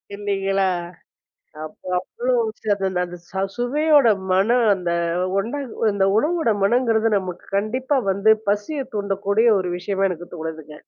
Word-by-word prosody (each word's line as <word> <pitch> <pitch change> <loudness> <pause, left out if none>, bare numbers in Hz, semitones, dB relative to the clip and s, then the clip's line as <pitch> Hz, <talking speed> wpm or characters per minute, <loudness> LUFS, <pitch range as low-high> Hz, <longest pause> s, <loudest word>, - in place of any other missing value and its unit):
இல்லீங்களா! 195 -1 0 1.0
அப்போ 155 +3 -11
அவ்ளோ 245 +7 -3 0.3
ச - - -35 0.2
அந்த 185 -1 -2
அந்த 175 0 -9
ச - - -22 0.2
சுவையோட 290 +3 +3 0.2
மனம் 225 +6 +3
அந்த 180 -3 -3 0.5
ஒண்டாங்க 235 0 -2
இந்த 195 -1 +2
உணவோட 315 0 +1
மனங்கிறது 225 0 +2
நமக்கு 185 -3 -6
கண்டிப்பா 255 +7 0
வந்து 200 +3 +4 0.2
பசிய 210 +9 -1
தூண்டக்கூடிய 200 +2 0
ஒரு 180 -1 -2
விஷயமா 195 +1 0
எனக்கு 175 -1 -6
தோணுதுங்க. 160 -2 -7
205 Hz, 125 wpm, -22 LUFS, 190-240 Hz, 1.0 s, வந்து